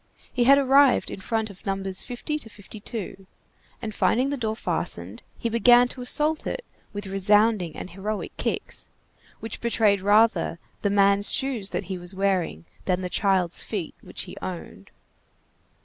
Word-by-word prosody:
He 245 -2 +1
had 275 +2 +7
arrived 275 -1 +4
in - - -7
front 220 +1 -2
of 195 - -18
No. 195 -2 -2
50 245 - -2
52, 205 -3 -8 0.6
and 215 -1 -4
finding 255 +6 +1
the - - -1
door 220 -4 -2
fastened, - - +1 0.2
he - - -3
began 240 +2 +5
to 255 - -8
assault 300 +5 +2
it - - -4 0.3
with 205 0 -6
resounding 195 -1 +2
and 185 - -8
heroic 205 +3 -5
kicks, - - -3 0.5
which 225 - -6
betrayed 215 -4 +2
rather 210 -3 +3 0.2
the 200 - +1
man's 200 0 +4
shoes 250 -7 0
that - - -3
he 190 -2 -6
was 175 +2 -2
wearing 185 - -1 0.2
than 185 -1 0
the 180 - -4
child's 185 -3 +1
feet 195 -7 -5
which - - -5
he - - -9
owned. 170 - -8
210 Hz, 155 wpm, -25 LUFS, 195-240 Hz, 0.6 s, had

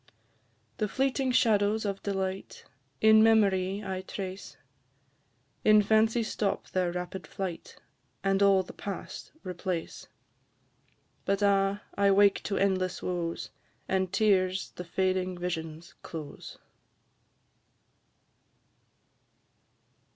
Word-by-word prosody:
The 215 - 0
fleeting 265 +2 0
shadows 215 -3 +2
of 195 -1 -3
delight, 190 -1 -4 0.4
In 220 0 +7
memory 200 -3 +3
I 190 -1 -3
trace; 190 0 -7 1.1
In 215 -1 +6
fancy 220 +2 +3
stop 210 -2 -2
their 180 -2 0
rapid 180 +2 -5
flight, 185 -4 -6 0.5
And 195 0 +1
all 195 -1 +5
the - - -11
past 200 -3 -7
replace; 180 -2 -4 1.2
But, 200 +1 0
ah! 200 0 +2
I 200 0 +3
wake 200 0 +4
to 200 - -1
endless 185 -2 0
woes, 170 -2 -3 0.4
And 190 -1 0
tears 190 -3 +1
the 180 - -8
fading 185 +1 -1
visions 165 -2 -5
close! 155 -3 -8
195 Hz, 100 wpm, -29 LUFS, 185-205 Hz, 1.2 s, In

